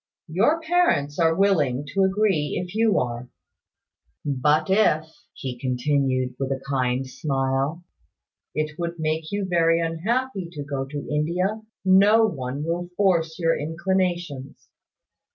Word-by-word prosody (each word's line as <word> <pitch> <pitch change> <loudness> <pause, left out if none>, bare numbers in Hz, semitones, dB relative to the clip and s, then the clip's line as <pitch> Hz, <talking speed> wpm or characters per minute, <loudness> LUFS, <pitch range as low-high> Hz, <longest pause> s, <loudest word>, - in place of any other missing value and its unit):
Your 225 - +2
parents 320 - +1
are 165 -1 +3
willing 150 -9 +2
to 195 - +2
agree 190 -7 +1
if 180 0 -6
you 220 0 +3
are. 120 0 -2 1.0
But 150 +3 +2
if," 190 -6 +3 0.3
he 125 -2 -6
continued, 130 0 0
with 135 0 -2
a 135 - -1
kind 130 -1 0
smile, 135 +4 -1 0.7
"it 155 +1 -2
would 170 0 -3
make 155 0 -2
you 205 -1 -1
very 165 -2 +3
unhappy 190 +5 -1
to 145 -3 -5
go 140 -1 -3
to 145 +1 -6
India, 180 +8 -1 0.2
no 200 +4 +6
one 135 -7 -3
will 175 +2 -2
force 170 -5 +2
your 165 -2 +2
inclinations." 170 -3 -2
160 Hz, 130 wpm, -24 LUFS, 140-190 Hz, 1.0 s, no